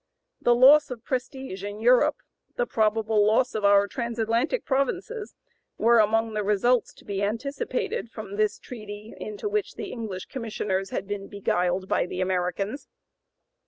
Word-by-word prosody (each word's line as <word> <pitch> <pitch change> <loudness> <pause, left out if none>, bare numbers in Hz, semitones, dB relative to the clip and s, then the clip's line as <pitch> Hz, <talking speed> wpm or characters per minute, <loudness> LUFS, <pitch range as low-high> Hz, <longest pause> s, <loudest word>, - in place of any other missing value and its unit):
The 240 - +4
loss 275 +5 +7
of 245 -3 -7
prestige 260 -6 -4
in 205 +1 -5
Europe, 245 +2 +3 0.3
"the - - 0
probable 220 - +2
loss 225 +5 +3
of 215 - -3
our 200 0 +5
trans 235 +1 -4
Atlantic 235 - 0
provinces," 370 - -2 0.4
were 235 +1 +5
among 225 +1 +2
the 210 0 -1
results 210 +4 +2
to - - -18
be 200 -1 -3
anticipated 275 - -2
from 215 -3 -8
this 210 0 +1
treaty 215 -2 -9
into 210 - -5
which 420 -1 -2
the 400 - -6
English 210 -6 -5
Commissioners 210 -6 -3
had 195 - -4
been 200 -1 -4
beguiled 185 -2 -1
by - - +1
the 180 - -5
Americans. 185 - -1
220 Hz, 155 wpm, -26 LUFS, 205-255 Hz, 0.4 s, loss